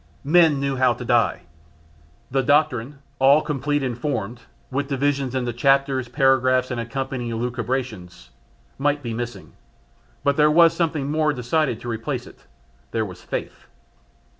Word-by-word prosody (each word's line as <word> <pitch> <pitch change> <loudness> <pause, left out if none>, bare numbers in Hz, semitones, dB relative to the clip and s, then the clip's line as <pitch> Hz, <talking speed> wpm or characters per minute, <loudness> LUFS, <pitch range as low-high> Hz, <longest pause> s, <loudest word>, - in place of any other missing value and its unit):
Men 155 -1 +4
knew 140 -1 -1
how 125 -1 +3
to 125 - -8
die. 115 -2 +2 0.9
The 135 +1 +2
doctrine 145 -1 +1 0.2
all 140 +3 +5
complete 145 0 -1
and 125 -3 -2
formed, 120 -3 -3 0.3
with 140 +2 -1
divisions 135 -1 -1
into 125 -2 -1
chapters, 135 +1 +2
paragraphs, 130 -1 +2
and 120 -2 -2
accompanying 130 0 -4
elucubrations 115 - -4 0.5
might 145 +1 0
be 115 -2 -4
missing; 120 -4 -6 0.7
but 140 -1 +1
there 150 0 +5
was 165 +1 +6
something 155 -5 -1
more 155 -1 +1
decided 125 0 0
to - - -8
replace 115 -1 -3
it, - - -17 0.4
there 110 -1 -1
was 90 -3 -10
faith. - - -6
130 Hz, 140 wpm, -22 LUFS, 120-145 Hz, 0.9 s, was